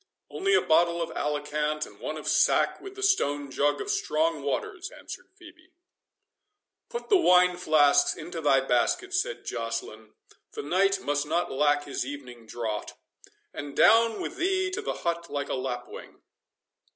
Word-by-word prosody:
"Only 390 +1 +1
a - - +3
bottle 170 +2 +3
of 165 -1 -3
Alicant, 150 0 -2
and - - -16
one - - -5
of - - -8
sack, - - +2
with 390 0 -10
the 395 - -7
stone 145 - +1
jug 145 +2 +1
of 415 - -3
strong 335 -5 0
waters," 400 -4 -3
answered 370 -2 -10
Phœbe. 350 -1 -16 1.2
"Put 475 0 -6
the 405 - +6
wine 180 - +5
flasks 155 -5 +3
into 170 -2 -7
thy 135 -3 +4
basket," 135 - 0
said 485 +7 -1
Joceline, 115 -1 -5 0.4
"the - - -5
knight 195 +5 +2
must 145 0 -1
not 170 +3 0
lack 145 +1 +2
his 140 - -3
evening 125 -4 -9
draught—and 120 +5 -8
down 230 -1 +5
with - - -5
thee 375 +1 0
to 380 - -3
the - - -3
hut 170 0 -2
like 140 0 -3
a - - -1
lapwing. 125 -2 -6
165 Hz, 155 wpm, -27 LUFS, -, 1.2 s, the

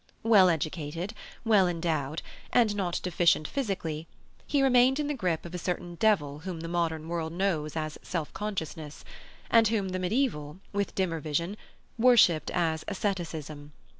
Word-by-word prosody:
Well 205 -5 +6
educated, 165 +3 -2 0.3
well 205 -5 +5
endowed, 165 -4 -2 0.3
and 225 -4 +3
not 180 -4 -1
deficient 170 -3 +2
physically, 170 - -3 0.4
he 280 -2 +2
remained 260 +1 +5
in 300 - 0
the 295 - -1
grip 180 - -1
of 170 - -8
a 180 - -3
certain 175 0 -3
devil 165 -8 +1
whom 170 0 -6
the 165 - -5
modern 165 -2 -1
world 165 -1 -3
knows 170 -5 -1
as 155 -1 -3
self 165 -4 -4
consciousness, 160 -7 -5 0.5
and 225 -1 +6
whom 205 -3 0
the 185 0 -2
medieval, 180 - -1 0.2
with 200 0 -1
dimmer 175 -4 0
vision, 165 +6 -2 0.4
worshipped 225 -10 +5
as 160 -3 0
asceticism. 160 -7 -4
175 Hz, 150 wpm, -28 LUFS, 160-205 Hz, 0.5 s, Well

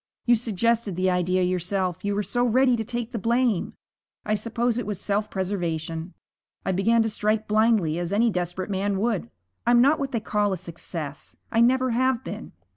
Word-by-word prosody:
'You 240 - +5
suggested 230 -2 +1
the 185 +1 +1
idea 180 +1 +1
yourself. 180 0 -1
You 205 0 0
were 210 - 0
so 245 +6 0
ready 250 +1 +4
to 225 - -2
take 240 0 -4
the 235 - -3
blame. 235 -2 +1 0.5
I 215 - 0
suppose 230 +3 0
it 210 - -4
was 205 -3 -3
self 205 +1 -1
preservation. 170 -3 -3 0.5
I - - +1
began 225 +5 +3
to 225 - 0
strike 215 +1 0
blindly 215 -7 +2
as 175 0 -3
any 225 +3 +3
desperate 180 +1 -3
man 195 +1 0
would. 205 - -1 0.4
I'm 240 0 +6
not 280 +5 +4
what 275 -1 -2
they 235 - 0
call 210 -2 0
a - - -2
success 160 -3 -8 0.2
I 230 - +3
never 255 +1 +3
have 255 +1 +1
been. - - -7
210 Hz, 190 wpm, -25 LUFS, 185-235 Hz, 0.5 s, I'm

